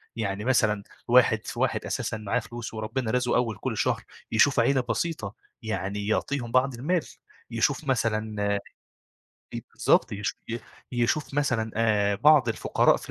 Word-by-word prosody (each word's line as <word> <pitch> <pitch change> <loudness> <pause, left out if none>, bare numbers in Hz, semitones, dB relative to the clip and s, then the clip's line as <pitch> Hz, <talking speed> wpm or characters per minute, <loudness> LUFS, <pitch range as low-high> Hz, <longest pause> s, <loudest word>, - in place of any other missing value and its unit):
يعني 105 -1 -3
مثلًا 105 -5 +2 0.2
واحد 120 -3 +4
في - - -6
واحد - - 0
أساسًا 110 - -2
معاه 110 +3 -1
فلوس 120 0 -7
وربنا 110 +2 -3
رازقه 125 -1 +1
أول 115 -4 0
كلّ - - -3
شهر، - - 0 0.3
يشوف 130 +4 +4
عيلة 130 +2 +3
بسيطة، 155 -12 -2 0.3
يعني 105 -2 -3
يعطيهم 120 +2 -1
بعض 130 +1 +3
المال، 155 +8 -1 0.5
يشوف 130 +6 +1
مثلًا 110 -4 0 0.2
آآ 100 - 0 1.0
إ - - -2
بالضبط - - +2
يش 105 0 -2 0.2
ي 120 - -2 0.3
يشوف 125 +5 0
مثلًا 125 -7 0
آآ 105 -3 +2
بعض 145 +1 +5
الفقراء 115 - +2
في - - -9
115 Hz, 150 wpm, -26 LUFS, 110-130 Hz, 1.0 s, بعض